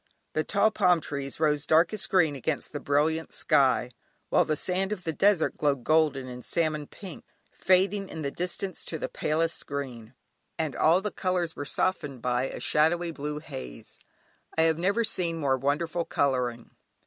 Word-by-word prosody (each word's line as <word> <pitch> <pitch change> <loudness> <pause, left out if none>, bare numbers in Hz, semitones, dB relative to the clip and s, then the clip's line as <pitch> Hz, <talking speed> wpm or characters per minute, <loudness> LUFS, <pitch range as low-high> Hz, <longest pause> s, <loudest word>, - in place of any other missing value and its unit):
The 155 - +1
tall 215 +4 +2
palm 180 -4 +3
trees 140 -3 -5
rose 150 -2 +1
darkest 170 +6 +3
green 160 -6 +3
against 140 +3 -2
the 145 - -3
brilliant 155 +3 0
sky, 135 -5 +2 0.4
while - - +4
the 155 - 0
sand 190 +4 -1
of 195 -4 -4
the 160 - -2
desert 195 0 +2
glowed 140 -4 0
golden 150 -3 +2
and 125 0 -8
salmon 155 -3 -1
pink, 185 -6 -10 0.3
fading 190 +2 +2
in 160 - -6
the 140 - -2
distance 180 +2 -4
to 160 - -4
the - - -3
palest 165 +2 -1
green; 130 -4 -6 0.4
and 155 -4 -2
all 170 +4 +4
the 210 0 -3
colours 180 -3 -1
were 145 - -5
softened 150 -6 -1
by 125 +2 0
a - - -5
shadowy 165 +3 +2
blue 150 -1 -5
haze. 135 - -9 0.6
I 160 - +5
have 160 0 +2
never 200 +6 +1
seen 175 -6 +1
more 140 -4 +1
wonderful 160 +6 -1
colouring. 125 -4 -1
155 Hz, 170 wpm, -27 LUFS, 140-175 Hz, 0.6 s, I